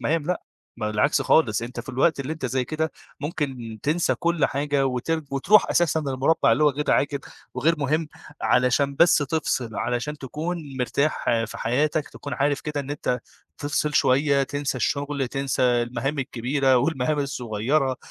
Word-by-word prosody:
مهام 160 0 0
لأ. 180 +1 -1 0.3
بالعكس 105 +4 +1
خالص، 115 -7 +3
أنت 120 +2 -5
في - - -14
الوقت 135 +4 +2
اللي 140 +3 -3
أنت 155 -5 -4
زَي 130 +1 -1
كده 155 +3 -2 0.3
ممكن 135 -7 -4
تنسى 160 +4 +1
كل 170 -3 +1
حاجة 140 -1 0
وترج 150 +5 -1
وتروح 170 +10 +4
أساسًا 160 -2 +2
للمربع 135 -1 +2
اللي 130 +7 +3
هو 150 - +6
غير 150 +2 -2
عاجل 140 0 +2 0.4
وغير 155 +7 +2
مهم، 150 +2 0 0.3
علشان 125 +3 +2
بس 170 -1 +6
تفصل، 135 -6 -1
علشان 125 +5 -2
تكون 150 +1 -5
مرتاح 130 +5 0 0.2
في - - -9
حياتك، 145 +5 0
تكون 140 -2 -7
عارف 145 +2 +1
كده 150 -1 -3
إن 140 0 -7
أنت 125 -4 -1 0.4
تفصل 150 +1 -1
شوية، 140 +1 +3
تنسى 140 0 -2
الشغل، 140 0 -1
تنسى 135 0 -1
المهام 120 +3 0
الكبيرة، 130 +1 +1
والمهام 150 +2 +1
الصغيرة، 130 0 0
140 Hz, 155 wpm, -24 LUFS, 125-150 Hz, 0.4 s, هو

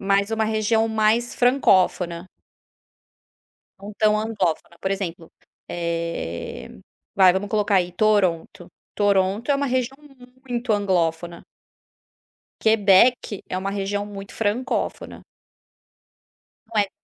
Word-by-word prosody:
mas 200 +2 +1
uma 225 0 0
região 220 +1 +1
mais 220 +2 +1
francófona. 185 -8 +2 1.5
Não 200 +2 -9
tão 215 0 +3
anglófona, 195 -6 -2
por 190 - -2
exemplo, 180 -4 -4 0.4
eh, 170 - -4 0.5
vai 190 -2 +6
vamos 190 +2 -3
colocar 210 -1 +1
aí 180 -1 0
Toronto, 185 -4 0 0.3
Toronto 200 +4 +1
é 285 - +4
uma 280 0 -1
região 255 +1 -1 0.5
muito 240 -1 -1
anglófona. 175 -4 -1 1.2
Quebec 220 0 +3
é 185 - -3
uma 195 +1 -3
região 205 +1 -2
muito 200 -1 -9
francófona. 225 +4 -3 1.5
Não 215 - +1
é - - +3
que 195 - -14
200 Hz, 110 wpm, -22 LUFS, 185-220 Hz, 1.5 s, vai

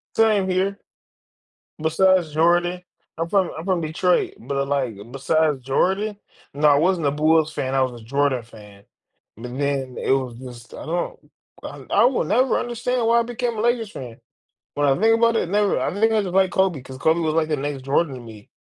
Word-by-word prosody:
Same 215 -4 +3
here. 190 +2 0 1.0
Besides 170 0 +2
Jordan. 175 +3 +2 0.4
I'm 165 +1 -3
from 195 -3 +2
I'm 160 - -6
from 185 -2 0
Detroit, 170 +3 0
but 140 0 -3
like, 130 -7 -1
besides 150 +1 0
Jordan 190 - 0 0.4
no, 150 +1 +2
I 145 - +6
wasn't 165 0 +2
a - - +2
Bulls 155 +1 +2
fan, 130 0 -3
I 135 - +2
was 120 -3 -2
a - - -14
Jordan 135 0 0
fan, 105 -3 -15 0.5
but 125 +2 -7
then 140 -3 -2
it - - -1
was 130 -3 0
just, 120 -2 -11
I - - -8
don't 175 +2 -4 0.3
I - - -9
I - - +4
will 250 -7 +2
never 250 +9 +2
understand 240 0 -2
why 235 +1 +4
I 235 - +1
became 240 0 -3
a - - -1
Lakers 235 -2 0
fan. 120 -3 -9 0.6
When 145 0 +1
I 135 +5 +2
think 225 +1 +4
about 230 0 +3
it, 180 - 0
never, 205 +2 +1
I - - -2
think 220 +3 +2
I 215 -2 +2
just 180 - -5
like 190 -1 +3
Kobe 190 -6 +1
because 130 +1 -11
Kobe 160 +5 +2
was 160 -1 -1
like 160 -1 +1
the 150 - +1
next 140 -1 -4
Jordan 140 +1 0
to - - -8
me. 110 -3 -13
160 Hz, 205 wpm, -22 LUFS, 135-195 Hz, 1.0 s, I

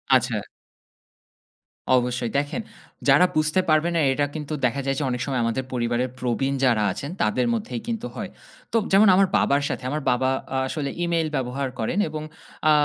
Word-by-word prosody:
আচ্ছা। - - +1 1.6
অবশ্যই। 125 -1 -1
দেখেন 145 +11 -1 0.5
যারা 140 +6 +7
বুঝতে 155 +3 +2
পারবে 155 +2 +3
না - - +3
এটা 145 +2 +1
কিন্তু 155 0 -4
দেখা 130 +3 0
যায় 135 0 0
যে, - - -1
অনেক 125 -1 -2
সময় 135 -3 -1
আমাদের 115 +3 -1
পরিবারের 120 +1 0
প্রবীণ 130 +2 0
যারা 115 -4 +3
আছেন 140 +9 -5
তাদের 120 +4 +2
মধ্যেই 115 +2 -3
কিন্তু 230 0 -3
হয়। - - -5 0.4
তো - - +4
যেমন 200 +3 +6
আমার 195 +1 +5
বাবার 140 +1 +2
সাথে - - -4
আমার 150 +3 -2
বাবা 130 +1 +1 0.3
আ - - +1
আসলে 140 0 -3
email 170 -2 +1
ব্যবহার 135 +1 -2
করেন 115 - -1
এবং 155 0 -5 0.5
আ - - +7
135 Hz, 175 wpm, -24 LUFS, 125-155 Hz, 1.6 s, যারা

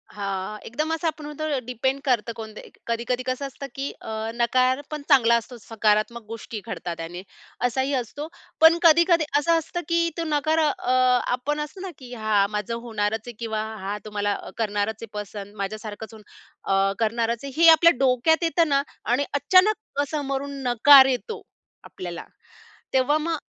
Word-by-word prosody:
हां. 200 0 -4
एकदम 305 +7 -2
असं 325 +1 -1
आपण 310 -1 -4
म्हणतो 300 +1 -5
ना 285 - 0
डिपेंड 255 +3 -1
करतं 245 -5 +1
कोणते 220 -1 -8
एक - - -19
कधी-कधी 235 +2 -1
कसं 255 +2 -2
असतं, 275 +1 -8
की 275 +1 -3
अ, - - -8 0.3
नकार 255 +3 +2
पण 305 -1 -4
चांगला 235 -5 +6
असतोच 235 0 -5
सकारात्मक 220 +1 +1
गोष्टी 225 0 -7
घडतात 175 -6 -5
त्याने 170 +2 -6 0.5
असाही 265 +3 -1
असतो. 265 +4 -3 0.3
पण 320 +1 +8
कधी-कधी 335 0 +5
असं 330 +3 +3
असतं 340 +2 -4
की 335 0 +2
तो 335 - -1
नकार 310 +1 +1
अ, 295 -5 0 0.4
आपण 280 +4 -2
असतो 300 +6 -6
ना, 380 -1 -5
की 250 -2 -11
हां, 215 -3 +2
माझं 210 +2 -3
होणारच 220 -2 -2
आहे 240 - -6
किंवा 220 -2 -2 0.2
हां, 200 +2 -3
तुम्हाला 205 -1 -1 0.2
करणारच 210 -1 -1
आहे - - -6
पसंद. 205 0 -8
माझ्यासारखंच 215 +2 -6
अन् 215 -1 -13 0.5
अ, 195 0 +2
करणारच 230 +1 0
आहे, 275 - -6
हे 335 - +8
आपल्या 335 +1 +6
डोक्यात 270 +6 +2
येतं 335 0 +2
ना 275 -1 +3 0.3
आणि 270 +4 +2
अचानक 370 +1 +2
समोरून 280 -2 -3
नकार 265 +3 +8
येतो 265 - -2 0.4
आपल्याला. 175 -2 -8 0.7
तेव्हा 265 +3 +3
मग 325 +1 -2
250 Hz, 165 wpm, -24 LUFS, 220-300 Hz, 0.7 s, पण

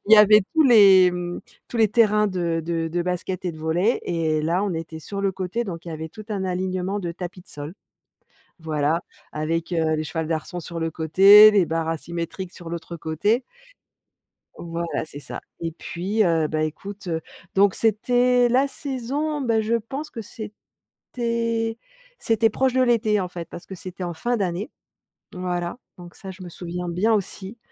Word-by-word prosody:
il 220 - +3
y - - +11
avait 210 0 +8
tous 320 - +6
les 195 -8 +7
mmh, 175 0 -4 0.3
tous 240 - -5
les 220 -1 +4
terrains 210 -1 +4
de 170 -3 -1
de 165 -1 -1
de 175 +2 -1
basket 180 +1 -3
et 180 - 0
de 155 - -11
volley 175 +9 +1
et 160 -3 0
là, 170 +5 +1
on 190 -4 -1
était 160 0 -6
sur 200 +5 -5
le 195 -1 +1
côté 190 +6 -3
donc 175 -3 -7
il - - -5
y 165 - -5
avait 160 +1 -5
tout 215 +6 -11
un 200 -3 -2
alignement 185 +2 -2
de 175 -3 -3
tapis 180 +1 -7
de - - -21
sol. 150 +4 -8 0.9
Voilà, 155 +1 0 0.3
avec, 165 +3 -2
heu, 160 -2 +1
les 155 - -1
cheval 160 0 -3
d'arçons 165 +2 -3
sur 170 0 -6
le 165 0 -1
côté, 195 +7 +8
les 200 -3 +4
barres 165 0 -1
asymétriques 170 +3 -4
sur 170 -2 -10
l'autre 170 0 -6
côté. 185 - 0 1.2
Voilà, 170 -1 -3
c'est 145 - -9
ça - - -7 0.2
et 165 -1 -3
puis, 185 +6 -2
heu, 165 -3 +2
bah, 155 0 -1
écoute, 195 +6 -5
heu, 165 -1 -1 0.3
donc 195 0 +4
c'était 245 +3 +3
la 260 +3 +4
saison, 285 +2 -3
bah 230 -4 +2
je 225 +2 0
pense 270 +7 -6
que 230 - -7 0.7
c'était 230 -1 -2 0.4
c'était 225 0 +2
proche 260 +3 +1
de 260 - +3
l'été 225 -4 +3
en 185 - -2
fait, 170 -2 -8
parce 175 - -9
que 190 - -8
c'était 185 +1 -7
en 175 -1 -3
fin 240 +8 -1
d'année. 190 +4 -2 0.6
Voilà. 180 +1 -3 0.2
Donc 175 -1 -11
ça, 190 - -9
je 185 0 -11
me 175 - -8
souviens 175 +1 -6
bien, 180 +6 +1
aussi. 200 +1 -3
185 Hz, 190 wpm, -23 LUFS, 165-215 Hz, 1.2 s, y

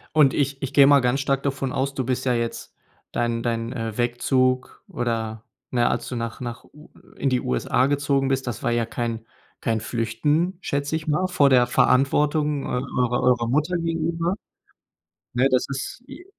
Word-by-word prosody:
Und 145 -4 +5
ich 140 -1 -1
ich 135 0 -4
gehe 140 -1 +7
mal 145 -1 +7
ganz 125 +2 +1
stark 135 -1 0
davon 135 -2 -2
aus, 135 +1 -1
du 130 - -2
bist 130 0 -1
ja 125 - +2
jetzt 115 -1 -3 0.4
dein 115 -1 -1
dein, 115 0 -2
äh, 115 -3 -4
Wegzug 130 +1 0
oder 115 -2 -3 0.2
na, 120 -1 +2
als - - -2
du 125 - -4
nach 115 +1 -5
nach 120 -1 -6
U 150 +1 -18 0.3
in 135 - 0
die 125 -1 +1
USA 65 - +1
gezogen 140 -1 +1
bist, 135 -1 0
das 120 - -4
war - - 0
ja 120 -1 +1
kein 115 -1 -4 0.4
kein 115 -1 0
flüchten, 145 - 0
schätze 140 +1 -2
ich 155 - -9
mal, 180 +5 +1
vor 145 -7 +3
der 125 -2 +5
Verantwortung 145 +3 +2
eurer 125 -1 -1
eurer 125 -2 +3
Mutter 155 +7 +1
gegenüber. 165 +2 -1 1.0
Ne, 125 +3 +3
das 130 -1 +2
ist, 140 - -5
j 355 - -11
130 Hz, 180 wpm, -23 LUFS, 120-145 Hz, 1.0 s, gehe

